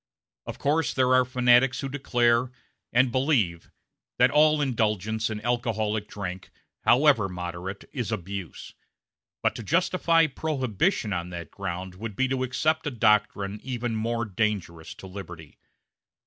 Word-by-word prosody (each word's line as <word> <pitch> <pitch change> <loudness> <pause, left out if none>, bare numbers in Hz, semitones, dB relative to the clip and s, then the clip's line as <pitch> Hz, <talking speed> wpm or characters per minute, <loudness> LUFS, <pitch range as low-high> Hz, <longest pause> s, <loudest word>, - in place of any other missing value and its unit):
A - - -6
Of - - -5
course 150 0 0
there 130 -1 +3
are 130 0 +5
fanatics 125 0 +3
who 135 - -3
declare 120 -3 +1 0.4
and 125 +1 +3
believe 120 - +1 0.5
that 125 +1 +5
all 150 +1 +4
indulgence 110 -4 0
in 110 -1 -4
alcoholic 110 -3 -1
drink, 95 -3 -6 0.4
however 125 -5 +4
moderate, 90 +2 -6
is 120 -5 -3
abuse; 95 -3 -6 0.7
but - - +2
to - - -7
justify 165 - +2
Prohibition 135 - -1
on 85 0 -3
that 85 -3 -7
ground 90 +1 -5
would 105 +2 -7
be 130 - +1
to 130 -1 -1
accept 130 +5 0
a - - +1
doctrine 105 -4 +1
even 120 -3 -3
more 115 +2 -1
dangerous 100 -6 -3
to - - -12
liberty. 90 -5 -10
115 Hz, 140 wpm, -26 LUFS, 100-130 Hz, 0.7 s, are